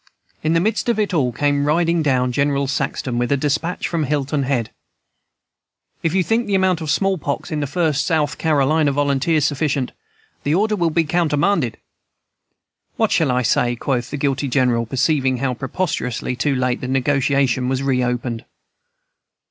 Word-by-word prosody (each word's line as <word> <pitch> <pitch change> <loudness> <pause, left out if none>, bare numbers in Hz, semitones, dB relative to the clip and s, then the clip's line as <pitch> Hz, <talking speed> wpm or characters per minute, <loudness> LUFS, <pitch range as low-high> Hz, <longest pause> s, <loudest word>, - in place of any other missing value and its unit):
In 155 +1 +1
the 165 - +3
midst 220 +6 0
of 235 - +1
it 210 -3 0
all 135 -7 +1
came 145 +3 0
riding 165 +2 +2
down 130 -4 +1
General 140 +2 +1
Saxton 135 -2 -2
with 120 +2 -1
a 140 - +3
despatch 150 +5 -1
from 165 -3 -1
Hilton 145 0 -1
Head: 130 -4 -1 1.3
"'If 165 +2 0
you 190 - +3
think 225 +5 0
the 200 - +1
amount 185 -3 +2
of 155 - -4
small 195 +4 +1
pox 145 +2 -4
in 155 - -1
the 145 - -2
First 155 -3 0
South 155 -4 0
Carolina 150 -1 +2
Volunteers 145 +2 +1
sufficient, 145 -3 -1 0.5
the 145 +2 0
order 210 +3 +2
will 170 -4 +1
be 165 +1 +2
countermanded.' 155 - +1 1.2
"'What - - +1
shall 160 -4 +2
I 125 0 +1
say?' 120 0 +1
quoth 125 0 -2
the 145 - -4
guilty 140 0 -1
General, 125 -3 +1
perceiving 130 0 +1
how 130 0 -1
preposterously 125 -3 -3
too 135 +2 0
late 125 -1 0
the 125 - -4
negotiation 135 -1 +1
was 130 +1 -1
reopened. 125 -3 -1
140 Hz, 165 wpm, -20 LUFS, 130-160 Hz, 1.3 s, the